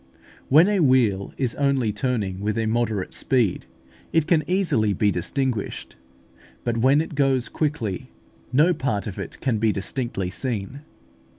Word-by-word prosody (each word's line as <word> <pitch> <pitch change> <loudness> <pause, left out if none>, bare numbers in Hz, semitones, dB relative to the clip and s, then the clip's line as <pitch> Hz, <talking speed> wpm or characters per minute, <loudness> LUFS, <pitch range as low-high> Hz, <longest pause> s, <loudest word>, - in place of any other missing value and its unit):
When 155 +7 +7
a 205 -2 +2
wheel 125 - +3
is 130 -3 -1
only 135 -6 +1
turning 105 -5 -2
with 105 +1 -2
a 115 - 0
moderate 110 -3 -1
speed, 120 -9 0 0.4
it 160 -2 +2
can 160 -1 +3
easily 170 - +2
be 105 +1 +2
distinguished; 120 +5 -3 0.7
but 120 -1 -1
when 135 +6 +4
it 160 - -6
goes 135 -3 +1
quickly, 120 - -2 0.4
no 155 +7 +4
part 130 -10 -2
of 100 - -6
it - - -7
can 120 -5 0
be 110 0 +3
distinctly 100 -2 -3
seen. 120 +3 -4
120 Hz, 150 wpm, -23 LUFS, 105-140 Hz, 0.7 s, When